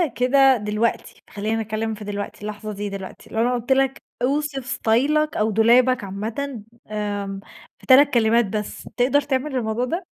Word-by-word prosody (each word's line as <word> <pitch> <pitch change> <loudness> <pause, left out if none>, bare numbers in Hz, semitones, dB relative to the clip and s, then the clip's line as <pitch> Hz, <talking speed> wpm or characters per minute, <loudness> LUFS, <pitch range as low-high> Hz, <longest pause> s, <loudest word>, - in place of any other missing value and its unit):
كده 265 +2 +4
دلوقتي، 210 +2 -2
خلّيني 215 +2 -2
أتكلّم 220 0 -3
في 210 0 -9
دلوقتي، 205 0 -5
اللحظة 210 0 -6
دي 205 0 -4
دلوقتي، 195 -1 -9
لو 220 - -1
أنا 245 +2 +2
قُلت 240 +3 -5
لك 270 0 +2 0.2
أوصِف 285 +2 0
إستايلك 280 +5 +1
أو 215 +1 +1
دولابك 235 +2 +4
عامةً 220 +5 -5 0.3
آمم، 205 -2 -3 0.4
في - - -17
3 280 +2 +6
كلمات 235 0 +4
بس، 210 +1 -5
تقدَر 265 +4 +3
تعمل 275 0 -2
الموضوع 235 0 -1
ده؟ 345 +7 -3
230 Hz, 160 wpm, -22 LUFS, 210-265 Hz, 0.4 s, 3